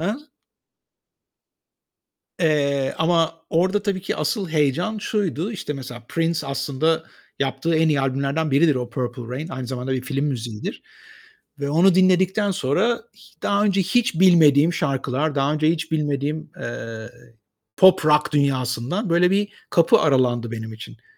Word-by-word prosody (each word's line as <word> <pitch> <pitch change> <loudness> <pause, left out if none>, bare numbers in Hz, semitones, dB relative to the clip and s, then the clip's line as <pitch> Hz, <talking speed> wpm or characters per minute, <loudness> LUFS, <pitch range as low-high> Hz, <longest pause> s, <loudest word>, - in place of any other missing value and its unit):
He? 170 - -2 2.3
Eee, 140 -5 +1
ama 165 0 +2 0.2
orada 190 +5 +1
tabii 195 -3 -2
ki 195 - -3
asıl 165 +4 -2
heyecan 155 +8 0
şuydu: 205 -3 -2
İşte 185 -8 -5
mesela 125 -3 -8
Prince 165 -2 -1
aslında 155 +4 -1 0.4
yaptığı 135 +4 -1
en 160 0 +3
iyi 145 -3 +1
albümlerden 140 +3 -1
biridir 145 +2 +4
o 125 -1 -3
"Purple 125 0 -4
Rain." 150 +5 -5
Aynı 130 -4 -6
zamanda 130 +1 -4
bir 130 -1 -1
film 135 +2 -2
müziğidir 120 -6 -5 0.8
ve 140 - -2
onu 175 +5 +4
dinledikten 190 +2 +3
sonra 180 - 0 0.2
h - - -21
daha 200 0 +1
önce 195 -2 +2
hiç 190 -2 0
bilmediğim 165 -4 +5
şarkılar, 140 0 -1
daha 140 +1 +1
önce 155 0 +1
hiç 165 -1 -2
bilmediğim, 150 0 -2
eee, 115 -1 -6 0.7
pop, 190 -4 +6
rock 150 0 +3
dünyasından 140 - 0
böyle 175 +2 +3
bir 205 +1 +1 0.2
kapı 170 -1 +4
aralandı 125 -5 +1
benim 110 -1 -6
için. 110 - -12
150 Hz, 140 wpm, -22 LUFS, 135-175 Hz, 2.3 s, pop